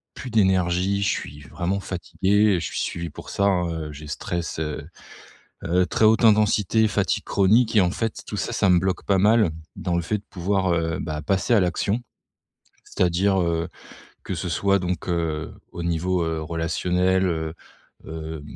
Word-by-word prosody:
plus 130 - -7
d'énergie, 95 -2 +2
je - - +1
suis 75 +2 -4
vraiment 90 +9 -3
fatigué, 95 +3 +1
et - - 0
je - - -4
suis - - -3
suivi 85 0 -3
pour - - -10
ça, 100 - -1
hein, 90 -3 +2
heu, 80 -2 -5
j'ai 75 +1 -10
stress 85 +3 -4
heu, 75 -2 -4 0.8
heu, 90 +2 +2
très 110 - +1
haute 110 +2 +5
intensité, 110 0 +4
fatigue 105 - 0
chronique 110 +4 +3
et 105 - +7
en 90 - +3
fait, 115 +1 -3
tout - - -5
ça, - - -2
ça 100 - +2
me 90 - +6
bloque 95 +1 -1
pas 100 -1 +2
mal, 105 -1 +4 0.3
dans 90 -2 -1
le 85 - 0
fait 105 +6 -1
de 100 - -17
pouvoir, 95 0 0
heu, 80 -1 0
bah 75 0 -4
passer 95 - +1
à 110 - +5
l'action. 100 +5 0 0.8
C'est-à-dire, 95 +2 +1
heu, 85 -1 -1 0.6
que - - -3
ce 90 +1 -4
soit 100 +4 +2
donc 90 -1 -3
heu, 80 -3 -2 0.2
au 85 - -6
niveau, 85 +1 0
heu, 80 -1 -2
relationnel, 90 +3 0
heu, 80 -2 -2 0.5
hem, 80 -1 -6
90 Hz, 180 wpm, -24 LUFS, 85-100 Hz, 0.8 s, et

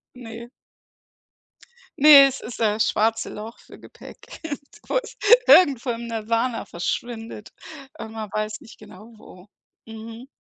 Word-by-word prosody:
Ne. 235 -1 -10 1.5
Ne, 285 -1 +9
es 270 - -5
ist 235 - -10
das 215 -1 +1
schwarze 225 +1 -1
Loch 220 +2 -10
für - - -16
Gepäck, - - -14
irgendwo 295 - -5 0.5
irgendwo 275 -8 +5
im 235 0 -6
Nasana 230 +2 -2
verschwindet, 225 +4 -6 0.4
äh, 225 - -8
man 220 -2 -8
weiß 215 0 -4
nicht 225 - -16
genau 215 +5 -15
wo. 185 -2 -16 0.4
Mhm. 225 +3 -11
225 Hz, 120 wpm, -22 LUFS, 220-245 Hz, 1.5 s, Ne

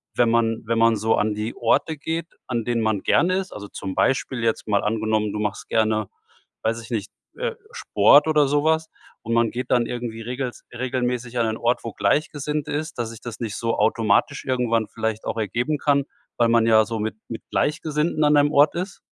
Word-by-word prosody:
wenn 120 -1 +3
man 115 -1 +1
wenn 115 +1 0
man 115 0 +5
so 110 +1 +1
an 105 0 +1
die 105 +2 -3
Orte 150 +6 +1
geht, 165 +3 -3 0.2
an 120 -2 -1
denen 120 0 0
man 110 -3 0
gerne 185 +2 +3
ist, 190 -1 -4
also 100 -1 -8
,zum 95 -1 -6
Beispiel, 130 +1 0
jetzt 115 -1 -1
mal 100 -1 +2
angenommen, 110 -1 0
du 105 - -3
machst 105 -1 -3
gerne, 110 -1 +1 0.6
weiß 115 +1 0
ich 115 - -12
nicht, 105 -3 -3 0.3
äh, - - -2 0.2
Sport 140 +9 +4
oder 150 -2 +4
so 145 +1 +1
was? 160 0 +2 0.3
Und 115 - -3
man 115 -1 +2
geht 125 +1 -5
dann 120 -1 +3
irgendwie 120 -2 -5
regelst 125 +2 -5
regelmäßig 125 -1 -2
an 120 - +2
einen 110 0 -2
Ort 120 +1 0
wo 115 - -4
Gleichgesinnt 150 +1 -1
ist, 155 +2 -3
dass 115 -2 -3
ich 115 - -11
das 120 -2 -7
nicht 110 -3 -3
so 115 0 -1
automatisch 115 +5 +2
irgendwann 120 -4 0
vielleicht 110 -1 -3
auch - - -2
ergeben 120 +8 -1
kann, 140 -1 +2 0.3
weil 120 - +4
man 115 -1 +4
ja 110 -1 +6
so 115 0 -4
mit 110 +1 -2
mit 115 - -7
Gleichgesinnten 155 0 0
an 150 0 +4
einem 145 0 +4
Ort 145 +1 +5
ist? 180 +2 -4
115 Hz, 205 wpm, -23 LUFS, 110-140 Hz, 0.6 s, ja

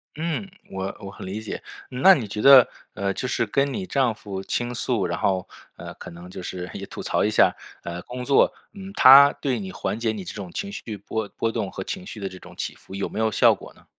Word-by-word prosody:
嗯， 165 +5 -3 0.2
我 95 0 -4
我 100 -1 -8
很 - - -10
理 95 +3 -4
解。 110 - -6 0.3
那 130 +10 +6
你 120 -7 -3
觉 105 +1 -4
得， 135 -1 +9 0.3
呃， 100 -1 -1
就 130 - -3
是 120 - 0
跟 135 +6 +1
你 190 +6 -4
丈 135 -9 +1
夫 105 -4 -7
倾 120 +5 -2
诉， 120 -4 0
然 85 -1 -2
后， 95 -2 0 0.3
呃， - - -9
可 - - -10
能 85 +1 -11
就 95 - -8
是 90 0 -6
也 - - -7
吐 - - -8
槽 - - +1
一 105 - +2
下， 105 - +4 0.3
呃， 85 +1 -5
工 125 0 -7
作， 140 - +4 0.2
嗯， 195 -1 -9
他 140 +2 +9
对 130 -4 -2
你 95 -2 -6
缓 110 - -3
解 115 -1 0
你 105 -3 -6
这 - - -7
种 95 -4 -7
情 200 - -4
绪 110 - -6
波 105 +2 -4
波 115 - 0
动 100 - -3
和 - - -5
情 185 0 -6
绪 115 - -8
的 100 - -3
这 90 -1 -10
种 - - -14
起 - - -3
伏 95 - -12
有 100 - -2
没 - - -6
有 110 0 +2
效 - - +5
果 - - -10
呢？ - - -22
110 Hz, 265 characters per minute, -24 LUFS, 95-135 Hz, 0.3 s, 得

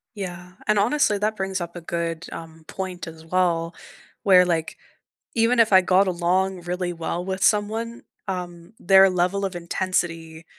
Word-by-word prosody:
Yeah, 180 -2 -7
and 215 -1 +3
honestly, 220 0 +2
that 215 +1 0
brings 190 -2 -3
up 170 0 -6
a 175 - -7
good, 170 0 -3
um, 160 -1 -10
point 185 -3 -6
as 160 0 -11
well 170 -1 0 0.5
where, 185 -2 +6
like, 165 -2 -2 0.6
even 235 +2 +2
if 225 -3 +4
I 190 - +8
got 185 +2 +3
along 185 +1 0
really 180 +1 -3
well 170 +1 -4
with 190 0 -4
someone, 220 +3 0 0.3
um, 175 -1 -6
their 190 +1 +6
level 185 +2 0
of 190 -2 -3
intensity 170 -2 -3
180 Hz, 160 wpm, -23 LUFS, 170-195 Hz, 0.6 s, I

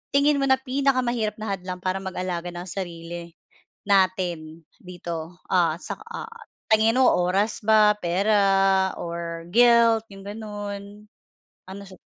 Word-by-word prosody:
tingin 285 +1 +4
mo 275 - +1
na 265 - +5
pinakamahirap 255 -5 0
na 215 -1 -5
hadlang 180 0 -7
para 185 +1 -1
mag-alaga 185 -2 -4
ng 175 +1 -7
sarili, 170 -2 -7 0.5
natin 180 -5 0 0.2
dito, 175 -1 -7
ah, 170 -4 +3
sa - - -7
ah, 460 -1 -7 0.4
tingin 220 +1 +4
mo, 260 - +6
oras 190 +5 +1
ba? 210 -1 +5
Pera, 195 +1 +2
or 170 -1 -5
guilt 230 0 +5
iyong 195 0 -11
ganoon? 205 -1 -6 0.8
Ano 195 +1 -8
sa 185 - -13
195 Hz, 130 wpm, -24 LUFS, 175-220 Hz, 0.8 s, mo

